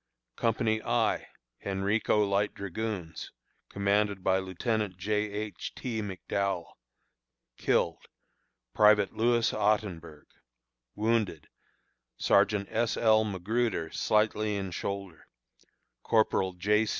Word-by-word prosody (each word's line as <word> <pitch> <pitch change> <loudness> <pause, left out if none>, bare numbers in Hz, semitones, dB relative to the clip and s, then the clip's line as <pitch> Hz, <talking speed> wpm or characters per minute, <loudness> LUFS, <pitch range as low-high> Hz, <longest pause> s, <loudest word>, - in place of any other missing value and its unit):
Company 110 -1 +1
I - - 0 0.4
(Henrico 100 +2 +1
Light 100 +1 0
Dragoons), 100 -4 -5 0.4
commanded 100 -1 0
by 95 0 +3
Lieutenant 95 +1 -2
J. 105 +3 0
H. 105 0 -5
T. 115 -4 -3
McDowell. 100 -2 -3 0.8
Killed: - - 0 0.7
Private 105 -2 +5
Louis 115 0 +2
Ottenburg. 100 -8 -1 0.7
Wounded: 110 -7 0 0.7
Sergeant 100 0 +3
S. 115 +1 0
L. 110 -1 +4
McGruder, 105 -2 -1
slightly 105 0 +1
in 95 -2 -3
shoulder; 100 -2 -5 0.7
Corporal 105 -4 +2
J. 105 +5 +2
105 Hz, 90 wpm, -29 LUFS, 95-110 Hz, 0.8 s, Private